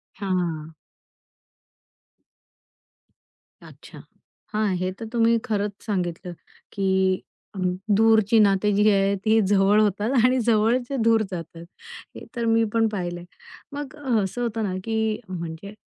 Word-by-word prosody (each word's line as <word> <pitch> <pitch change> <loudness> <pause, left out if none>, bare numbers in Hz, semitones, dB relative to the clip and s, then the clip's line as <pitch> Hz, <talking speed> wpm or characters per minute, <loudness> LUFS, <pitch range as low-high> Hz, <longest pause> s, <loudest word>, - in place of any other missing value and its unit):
हां. 170 -5 -3 2.9
अच्छा, - - -14 0.5
हां, 210 -3 0
हे 185 +1 -2
तर 225 - -5
तुम्ही 230 0 +3
खरंच 205 -1 -1
सांगितलं, 180 -3 -3 0.4
की 190 -1 +1 0.7
दूरची 220 0 +4
अ, - - +7
नाती 205 0 +3
जी 210 +1 +4
आहेत, 195 0 +2
ती 220 +1 +4
जवळ 200 +1 +4
होतात 210 +3 0
आणि 255 0 +3
जवळचे 240 +4 +1
दूर 225 -1 +4
जातात. 165 -1 -7 0.5
हे - - -9
तर 235 -1 -2
मी 225 0 +3
पण 225 -1 +3
पाहिलंय. 175 -4 -4 0.5
मग 290 0 -6 0.3
असं 195 +6 -4
होतं 225 -2 -2
ना, 190 -3 -2
की 220 -1 -1
म्हणजे 170 +3 -7
210 Hz, 120 wpm, -24 LUFS, 185-225 Hz, 2.9 s, अ